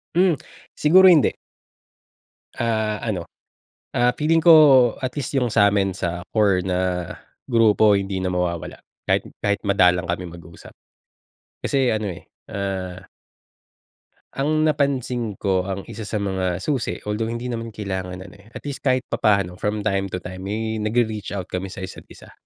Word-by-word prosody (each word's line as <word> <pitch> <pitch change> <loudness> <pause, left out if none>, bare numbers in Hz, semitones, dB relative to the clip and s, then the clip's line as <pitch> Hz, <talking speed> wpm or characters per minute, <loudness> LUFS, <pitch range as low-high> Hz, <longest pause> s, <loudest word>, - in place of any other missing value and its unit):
Hmm, 180 -2 +4 0.4
siguro 185 +5 +6
hindi. 165 -6 +5 1.3
Ah, 110 -2 0
ano, 100 -7 -3 0.7
ah, 120 0 +2
feeling 160 +2 +2
ko 150 -8 +7
at 130 - -1
least 140 - -4
yung 125 -3 +1
sa'min, 100 -2 +3
sa 90 -1 -4
core 100 -4 +2
na 90 -1 -1 0.3
grupo, 110 -3 +4
hindi 95 -1 -3
na 90 - -1
mawawala 90 -2 -3 0.2
kahit - - 0 0.2
kahit 100 -1 +1
madalang 90 -3 +3
kami 90 +1 -2
mag-usap. 85 -1 -13 0.9
Kasi 135 -4 +1
ano, 105 -2 -2
eh, 85 - -9 0.2
uh 95 -2 -4 1.3
ang 155 +3 +1
napansin 130 -7 0
ko, 95 -2 0
ang 95 0 -4
isa 110 -2 -7
sa - - -4
mga 95 -3 -2
susi, 135 -6 -1
although 105 +2 -2
hindi 120 +2 -4
naman 115 -1 -4
kailangan, 95 -4 -5
ano, 95 - -13
eh, 100 - -19
at - - -8
least 140 -1 -5
kahit 130 -2 +1
papaano 100 -4 +1
from 105 0 -2
time 95 -2 0
to 90 -2 -6
time 90 0 -7
may 110 +1 -2
nagre-reach 110 -2 -1
out 95 -3 -6
kami 90 +1 -3
sa 95 0 -8
isa't 95 - -9
isa. - - -15
105 Hz, 150 wpm, -22 LUFS, 95-120 Hz, 1.3 s, ko